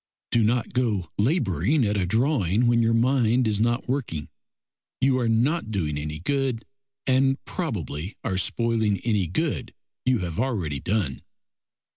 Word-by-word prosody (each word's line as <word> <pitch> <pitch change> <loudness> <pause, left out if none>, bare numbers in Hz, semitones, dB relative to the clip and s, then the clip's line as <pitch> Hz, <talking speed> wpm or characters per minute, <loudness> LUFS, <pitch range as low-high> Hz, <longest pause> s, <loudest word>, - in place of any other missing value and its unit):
Do 120 - +4
not 120 +2 0
go 110 -9 0
labouring 115 - +2
at 105 0 0
a 95 -3 0
drawing 115 - +2
when 120 0 +4
your 115 0 +3
mind 120 0 +3
is 105 -1 0
not 120 +3 +1
working; 115 - -2 0.7
you 130 -1 +3
are 120 -2 +1
not 125 +6 +1
doing 85 -8 -1
any 75 +1 -4
good, 130 - -1 0.4
and 135 +1 +3
probably 95 - -4
are 95 -1 -1
spoiling 110 -1 +1
any 105 -6 +1
good 95 - -2 0.3
you 130 0 +3
have 85 -5 -4
already 90 - -1
done. 90 -6 -1
115 Hz, 145 wpm, -25 LUFS, 95-130 Hz, 0.7 s, Do